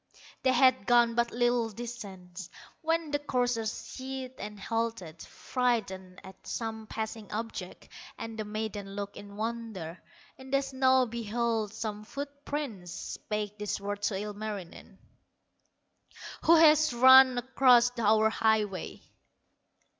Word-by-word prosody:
They 260 - +3
had 255 -6 +4
gone 240 -1 +5
but 235 0 +1
little 240 -1 +1
distance, 195 -6 -8 0.3
When 325 -1 0
the 290 - +1
courser 245 -5 0
shied 260 +3 -6
and 210 0 -7
halted, 225 -7 -3
Frighted 195 -8 -2
at 190 0 -14
some 220 -1 -4
passing 220 -1 -5
object; 225 +2 -6 0.3
And 225 0 -6
the 215 - -3
maiden 210 -2 -5
looked 200 0 -5
in 200 0 -11
wonder, 220 -7 -5 0.4
In 265 0 -11
the 275 +1 +2
snow 260 -1 +3
beheld 230 -1 -2
some 215 -2 -4
foot 285 +4 -7
prints, 235 -12 -4
Spake 210 +4 -5
these 210 -1 -2
words 205 0 -2
to 205 - -2
Ilmarinen: 205 -3 -7 1.5
"Who 335 - +7
has 310 -3 +6
run 260 +1 +8
across 245 -1 +4
our 220 0 +4
highway?" 215 -5 0
225 Hz, 125 wpm, -29 LUFS, 205-255 Hz, 1.5 s, run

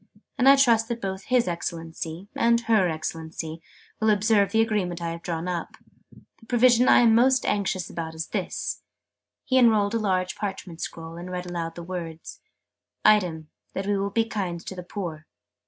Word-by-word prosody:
And 260 +2 +5
I 275 - +9
trust 235 -5 +4
that 235 0 -3
both 190 -2 -5
'His 250 -4 +2
Excellency' 165 +1 -5
and 235 0 +3
'Her 220 -6 +3
Excellency' 160 0 -5 0.4
will 220 -1 +2
observe 210 -1 +3
the 225 - +2
Agreement 200 -6 -1
I 170 -1 -3
have 170 0 -7
drawn 165 0 -3
up. 175 -2 -4 0.6
The 225 - -19
provision 245 +1 +4
I - - +7
am 230 -2 +5
most 255 +3 +4
anxious 190 -3 0
about 160 -1 -6
is 160 0 -5
this." - - -3 0.6
He 260 - +3
unrolled 215 -4 +4
a 230 - +1
large 185 -3 0
parchment 190 -5 -6
scroll, 165 0 -6
and 175 +1 -7
read 180 0 -4
aloud 170 -2 -4
the 170 - -7
words 165 -2 -7 0.7
"'item, 170 -7 +3 0.2
that 190 - -2
we 205 0 +1
will 200 0 -1
be 225 +3 +1
kind 190 -6 -3
to - - -5
the 180 - -6
poor.' 170 -4 -6
190 Hz, 180 wpm, -25 LUFS, 170-225 Hz, 0.7 s, I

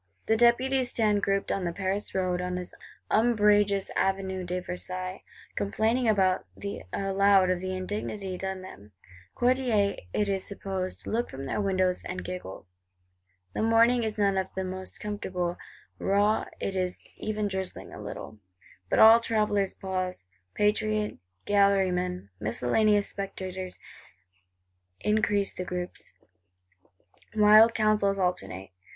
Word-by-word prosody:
The 220 - +3
Deputies 245 +2 +3
stand 210 -3 +2
grouped 195 0 0
on 195 - -1
the 170 - -1
Paris 195 +3 -3
Road, 180 -1 0
on 180 0 -2
this 180 0 -6 0.4
umbrageous 205 -3 +3
Avenue 190 -1 -1
de 180 +1 -2
Versailles; 185 +1 -5 0.3
complaining 225 +4 +1
aloud 195 - +1
of 180 - -4
the 185 +1 -3
indignity 195 0 -4
done 190 0 -4
them. 105 - -12 0.4
Courtiers, 240 -5 +2
it 210 - 0
is 195 -1 -1
supposed, 190 -2 -5
look 235 +2 -1
from 135 +1 -7
their 135 - -1
windows, 185 -2 +1
and 180 0 -5
giggle. 180 - -7 0.9
The - - -2
morning 230 +2 +4
is 220 -1 -3
none 200 -2 +2
of 190 0 -4
the 190 - -2 0.4
comfortablest: 180 -4 -3 0.4
raw; 205 +2 +2
it 195 - -3
is 185 -1 -2
even 215 -1 -2
drizzling 190 -1 -5
a - - -8
little. 110 - -8 0.5
But - - +1
all 225 +1 +9
travellers 210 -4 0
pause; 185 - -4 0.3
patriot 210 0 0 0.3
gallery 200 -2 +4
men, 180 - -3
miscellaneous 200 - +2
spectators 190 -2 -5 1.2
increase 210 -2 +1
the 180 - -4
groups. 180 0 -6 1.2
Wild 215 +2 +7
counsels 215 -2 +2
alternate. 180 - -2
195 Hz, 125 wpm, -28 LUFS, 185-210 Hz, 1.2 s, all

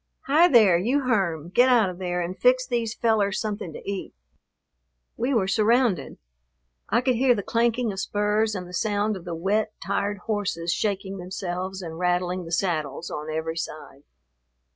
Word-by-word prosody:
Hi, 310 +6 +5
there, 215 - +6
you 250 +10 +1
Herm, 190 - 0
get 245 +7 +4
out 225 -7 +4
of 180 - -11
there 180 -1 -2
and 175 +2 -4
fix 255 +3 +3
these 235 -3 -2
fellers 210 -4 +1
something 210 -5 -4
to - - -10
eat." 200 - -5 1.0
We 245 +4 -1
were 220 -8 +2
surrounded. 215 - +2 0.7
I - - +3
could 255 0 +2
hear 245 +1 +3
the 200 - -3
clanking 235 +1 +1
of 190 - -6
spurs 210 +2 0
and 180 -2 -5
the 180 - -12
sound 205 +3 0
of 185 - -9
the 170 -1 -4
wet, 205 +5 0
tired 200 +1 -1
horses 185 -6 -1
shaking 195 -2 -2
themselves 185 +1 -4
and 165 -1 -7
rattling 180 0 0
the 165 - -9
saddles 170 -3 -1
on 150 +1 -5
every 160 +1 -3
side. 155 -3 -7
200 Hz, 170 wpm, -25 LUFS, 180-225 Hz, 1.0 s, there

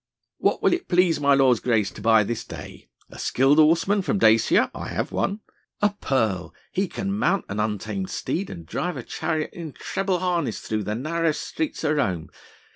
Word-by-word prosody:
"What - - +1
will - - +4
it 355 - -2
please 180 -3 +3
my 140 -1 +4
lord's 130 -4 +4
grace 110 -5 +1
to - - -11
buy 110 0 +5
this 115 +2 -3
day? - - -10 0.2
A - - -11
skilled 135 +4 +3
horseman 165 +6 +4
from 200 +3 0
Dacia?... 110 - +4
I - - -6
have - - -3
one.... 200 +2 -1 0.4
A 210 0 +3
pearl.... 110 -10 0 0.2
He 195 +1 0
can 195 +2 -3
mount 195 -3 +1
an 100 - -3
untamed 110 - -2
steed 195 +3 -3
and 85 -2 -8
drive 175 - -3
a 125 - -5
chariot 155 +2 -2
in 165 -5 -7
treble 190 -1 -2
harness 175 - -1
through 110 -2 -3
the 105 - -2
narrowest 155 +4 -1
streets 315 - -3
of 155 -1 +1
Rome.... 90 - -1
155 Hz, 190 wpm, -24 LUFS, 110-180 Hz, 0.4 s, buy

